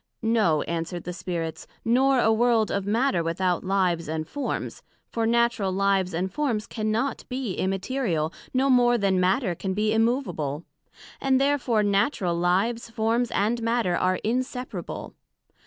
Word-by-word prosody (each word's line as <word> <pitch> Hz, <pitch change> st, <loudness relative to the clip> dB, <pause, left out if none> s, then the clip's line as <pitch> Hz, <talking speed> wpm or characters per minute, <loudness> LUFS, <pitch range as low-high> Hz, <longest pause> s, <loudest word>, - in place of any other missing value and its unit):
No, 215 Hz, -9 st, +2 dB
answered 170 Hz, +1 st, -4 dB
the 180 Hz, -, -5 dB
Spirits; 170 Hz, -3 st, -4 dB, 0.2 s
nor 260 Hz, +3 st, +3 dB
a 225 Hz, -2 st, +4 dB
world 225 Hz, -2 st, +2 dB
of 200 Hz, 0 st, -2 dB
Matter 225 Hz, -3 st, +2 dB
without 175 Hz, +1 st, 0 dB
Lives 185 Hz, -3 st, 0 dB
and 155 Hz, 0 st, -3 dB
Forms; 290 Hz, +8 st, -4 dB, 0.3 s
for 225 Hz, -1 st, 0 dB
Natural 235 Hz, -4 st, +2 dB
Lives 195 Hz, -1 st, +1 dB
and 180 Hz, +3 st, -2 dB
Forms 245 Hz, -8 st, -1 dB
cannot 220 Hz, +5 st, -2 dB
be 250 Hz, -6 st, -3 dB
immaterial, 190 Hz, -, -1 dB, 0.2 s
no 265 Hz, +1 st, +2 dB
more 245 Hz, -2 st, +4 dB
then 195 Hz, -3 st, +1 dB
Matter 185 Hz, +2 st, +2 dB
can 190 Hz, +2 st, -3 dB
be 215 Hz, +1 st, +1 dB
immovable. 225 Hz, -, 0 dB, 0.6 s
And 265 Hz, -1 st, +3 dB
therefore 270 Hz, -6 st, +2 dB
natural 200 Hz, -, +1 dB
lives, 195 Hz, +8 st, 0 dB
forms 225 Hz, +2 st, 0 dB
and 225 Hz, +4 st, 0 dB
matter, 230 Hz, -6 st, +1 dB
are 185 Hz, +1 st, +1 dB
inseparable. 250 Hz, +2 st, -3 dB
215 Hz, 140 wpm, -25 LUFS, 185-240 Hz, 0.6 s, a